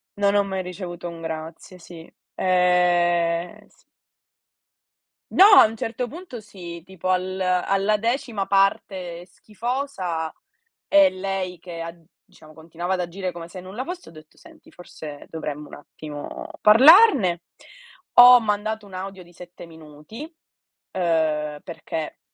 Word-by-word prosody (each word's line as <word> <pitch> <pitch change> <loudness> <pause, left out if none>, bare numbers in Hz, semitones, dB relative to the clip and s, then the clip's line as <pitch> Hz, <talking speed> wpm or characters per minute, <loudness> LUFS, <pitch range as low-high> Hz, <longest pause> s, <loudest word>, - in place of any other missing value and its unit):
Non 200 0 +1
ho 200 - +4
mai 190 -1 -3
ricevuto 180 -1 -7
un 170 -1 -10
grazie, 160 +3 -7
sì. 170 -1 -13 0.3
Ehm, 175 -2 +1
s - - -29 1.5
No, 385 - +7
a - - +9
un 220 +1 -3
certo 230 +3 -4
punto 315 -4 -9
sì, 175 -5 -10
tipo 185 -1 -6
al 185 +1 -1
alla 195 +3 +1
decima 230 -3 -2
parte 190 -3 0
schifosa 200 - -4 0.6
e 295 -1 +6
lei 185 -2 -4
che 170 -1 -9
ha 165 +1 -7 0.3
diciamo, 155 0 -18
continuava 170 +3 -5
ad 180 - -1
agire 180 +1 -4
come 170 -1 -9
se 180 +1 -10
nulla 195 +8 -6
fosse, 360 +1 -8
ho - - -15
detto: 155 -1 -17
"Senti, - - -18
forse 155 -4 -11
dovremmo 150 -2 -6
un - - -10
attimo 145 0 -9
parlarne." 230 - +6 0.8
Ho 245 0 +10
mandato 215 0 -2
un 190 - -16
audio 190 0 -7
di 175 - -20
7 175 0 -13
minuti, 160 - -13 0.7
uhm, 155 -4 -1
perché 165 -2 -6
180 Hz, 135 wpm, -23 LUFS, 170-205 Hz, 1.5 s, Ho